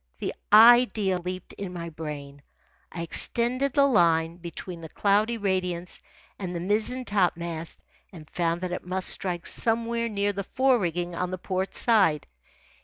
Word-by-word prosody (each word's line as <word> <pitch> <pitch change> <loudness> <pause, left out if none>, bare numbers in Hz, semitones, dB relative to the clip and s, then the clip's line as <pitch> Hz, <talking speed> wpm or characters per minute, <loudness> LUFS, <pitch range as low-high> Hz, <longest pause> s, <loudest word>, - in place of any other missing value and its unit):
The - - -4 0.2
idea 220 -4 +6
leaped 180 +1 -6
in 195 -2 -6
my 170 -1 -6
brain. 145 -3 -8 0.5
I 170 - -5
extended 245 +9 +1
the 280 -1 +4
line 170 -8 +2
between 170 0 -8
the 160 - -9
cloudy 210 +6 +1
radiance 180 -4 -2 0.4
and 180 -3 -5
the - - -2
mizzen 215 +7 -1
topmast 170 -5 -2 0.3
and 160 -5 -12
found 170 +1 -1
that 185 -1 -3
it 180 - -4
must 185 +1 -2
strike 175 -3 -1
somewhere 230 0 0
near 205 -1 -1
the 200 0 -4
fore 260 +4 +2
rigging 175 -1 -2
on 180 +1 -2
the 185 - -4
port 185 +1 -3
side. 195 -11 +3
185 Hz, 155 wpm, -26 LUFS, 170-215 Hz, 0.5 s, idea